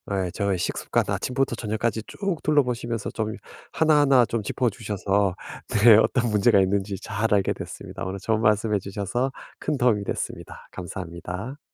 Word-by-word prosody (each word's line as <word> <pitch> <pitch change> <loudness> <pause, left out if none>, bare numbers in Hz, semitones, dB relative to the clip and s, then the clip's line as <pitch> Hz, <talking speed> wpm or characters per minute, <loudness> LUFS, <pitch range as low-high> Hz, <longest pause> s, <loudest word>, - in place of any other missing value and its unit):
예 90 -2 -1
저희 100 -3 0
식습관 90 - 0
아침부터 130 -1 0
저녁까지 110 0 -2
쭉 195 -5 -3
둘러보시면서 125 -7 0
좀 110 -1 -2 0.4
하나하나 145 -5 +5
좀 115 -1 -2
짚어주셔서 100 -5 0 0.5
네 115 -3 +10
어떤 120 +1 +2
문제가 100 -1 +4
있는지 95 +1 0
잘 105 +2 -1
알게 100 -2 +2
됐습니다. - - -8
오늘 95 +1 -4
좋은 110 +2 0
말씀 105 0 +2
해 100 - +3
주셔서 100 +7 -2 0.3
큰 150 -2 -1
도움이 115 -5 +2
됐습니다. - - -5
감사합니다. 90 - -6
110 Hz, 365 characters per minute, -25 LUFS, 100-120 Hz, 0.5 s, 네